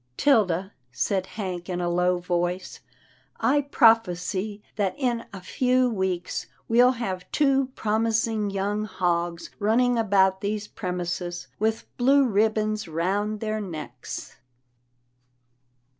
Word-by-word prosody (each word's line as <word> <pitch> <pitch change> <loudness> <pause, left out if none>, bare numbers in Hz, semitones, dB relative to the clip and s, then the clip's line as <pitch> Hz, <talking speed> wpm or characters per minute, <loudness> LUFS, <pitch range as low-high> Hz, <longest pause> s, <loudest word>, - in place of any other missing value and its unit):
" - - -44
'Tilda," 195 - +2 0.2
said 185 +10 -1
Hank 185 -4 -5
in 180 -1 -2
a 175 - -1
low 180 +1 +2
voice, 175 +1 -2 0.3
" - - -30 0.3
I 285 +2 +3
prophesy 215 -6 +2
that 200 -3 0
in 245 -4 -1
a 195 - -8
few 250 +6 +2
weeks 190 -3 -2 0.2
we'll 245 +2 +5
have 190 -7 -5
two 275 -3 +3
promising 220 0 0
young 200 +2 -1
hogs 175 -3 -1
running 235 +3 +3
about 190 -3 +3
these 210 +1 -2
premises, 175 -1 -4
with 220 +1 0
blue 275 +3 +5
ribbons 215 -1 +1
round 200 +6 -1
their 215 -1 -2
necks." 155 -10 -7
205 Hz, 120 wpm, -25 LUFS, 180-225 Hz, 0.3 s, we'll